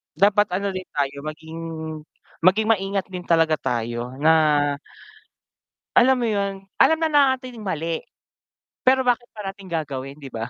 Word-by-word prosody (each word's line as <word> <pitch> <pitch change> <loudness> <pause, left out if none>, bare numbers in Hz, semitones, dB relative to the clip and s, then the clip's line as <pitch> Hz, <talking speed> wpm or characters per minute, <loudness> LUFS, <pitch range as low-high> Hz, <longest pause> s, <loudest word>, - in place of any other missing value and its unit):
Dapat 205 +4 +4
ano 200 +1 -1
din 185 -1 -6
tayo, 140 -1 -1
maging 160 +1 -7 0.8
maging 190 +5 +3
maingat 195 -2 0
din 180 -1 -5
talaga 165 -2 +3
tayo 120 +1 -3
na 150 +4 +4 1.6
alam 260 +2 +5
mo 240 - 0
yun, 200 -3 -1 0.2
alam 320 - +5
na 320 - +2 0.2
nating 255 -2 -9
mali. 165 -2 -2 0.9
Pero 260 0 +5
bakit 245 -1 +1
parating 195 -2 -7
gagawin 140 -5 -4
'di 140 -3 -11
ba? 115 +1 -4
185 Hz, 135 wpm, -23 LUFS, 150-210 Hz, 1.6 s, alam